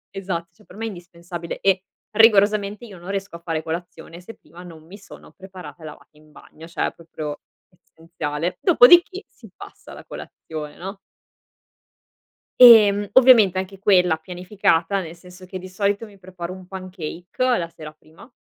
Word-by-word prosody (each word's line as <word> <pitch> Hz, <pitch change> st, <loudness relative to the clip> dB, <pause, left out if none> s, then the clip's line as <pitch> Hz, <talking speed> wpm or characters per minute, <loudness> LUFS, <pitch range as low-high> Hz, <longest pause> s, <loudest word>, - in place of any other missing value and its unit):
Esatto, 180 Hz, -3 st, -5 dB
cioè 215 Hz, -, -24 dB
per -, -, -17 dB
me 225 Hz, +1 st, -5 dB
è -, -, -2 dB
indispensabile 175 Hz, -2 st, -9 dB
e 195 Hz, -1 st, +2 dB, 0.3 s
rigorosamente 210 Hz, -1 st, +3 dB
io 200 Hz, -5 st, -12 dB
non 175 Hz, +3 st, -12 dB
riesco 195 Hz, -3 st, -5 dB
a -, -, -20 dB
fare 165 Hz, -2 st, -4 dB
colazione, 165 Hz, 0 st, -7 dB
se 225 Hz, +6 st, -12 dB
prima 175 Hz, -, -16 dB
non 160 Hz, -3 st, -13 dB
mi 195 Hz, +5 st, -13 dB
sono 200 Hz, -, -15 dB
preparata 185 Hz, -3 st, -13 dB
e -, -, -9 dB
lavata 150 Hz, -, -12 dB
in 155 Hz, 0 st, -22 dB
bagno, 160 Hz, +2 st, -15 dB
cioè 170 Hz, -, -3 dB
proprio 155 Hz, -3 st, -8 dB, 0.3 s
essenziale, 165 Hz, -1 st, -6 dB
dopodiché 350 Hz, -, +5 dB
si -, -, -17 dB
passa -, -, -13 dB
alla -, -, -11 dB
colazione 155 Hz, -2 st, -9 dB
no? 195 Hz, +3 st, -8 dB, 1.6 s
E, 225 Hz, -5 st, +9 dB
mhmm, 205 Hz, 0 st, -4 dB
ovviamente 235 Hz, -8 st, +6 dB
anche 190 Hz, +1 st, -5 dB
quella 180 Hz, -5 st, +3 dB
pianificata, 180 Hz, +1 st, -1 dB
nel 165 Hz, 0 st, -9 dB
senso 180 Hz, +1 st, -15 dB
che 185 Hz, +1 st, -8 dB
di 185 Hz, -, -10 dB
solito 200 Hz, +3 st, -1 dB
mi 205 Hz, -2 st, -17 dB
preparo 180 Hz, -1 st, -8 dB
un 185 Hz, -1 st, -13 dB
pancake 185 Hz, -2 st, -8 dB, 0.3 s
la 170 Hz, -1 st, -4 dB
sera 155 Hz, -1 st, -10 dB
prima. 155 Hz, -, -19 dB
180 Hz, 165 wpm, -21 LUFS, 170-200 Hz, 1.6 s, E